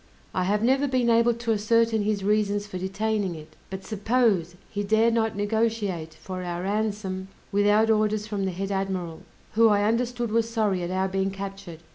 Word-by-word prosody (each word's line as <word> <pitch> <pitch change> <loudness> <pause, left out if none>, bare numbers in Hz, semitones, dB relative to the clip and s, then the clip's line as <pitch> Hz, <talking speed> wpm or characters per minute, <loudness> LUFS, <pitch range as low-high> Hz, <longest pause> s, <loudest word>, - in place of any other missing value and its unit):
I 185 - 0
have 205 +3 +1
never 270 +4 +3
been 255 -3 +2
able 230 +1 +4
to 230 -1 -1
ascertain 225 +1 +2
his 205 -1 -1
reasons 205 0 +1
for 185 -3 -6
detaining 195 0 -1
it, 155 -1 -12
but 190 0 -7
suppose 210 -5 +1
he 205 - -4
dare 220 +3 +3
not 225 -2 0
negotiate 205 -6 -1
for 185 -1 -7
our 175 0 -4
ransom 200 -2 -2 0.2
without 205 +2 +4
orders 215 -1 +1
from 205 -2 -2
the 190 - -1
head 195 +3 -4
admiral, 190 -4 -3 0.3
who 225 +1 +5
I 205 -1 +3
understood 235 +1 0
was 230 0 +1
sorry 215 -5 0
at 175 - -3
our 190 +1 0
being 190 0 -1
captured. 195 -3 -7
205 Hz, 180 wpm, -26 LUFS, 190-225 Hz, 0.3 s, who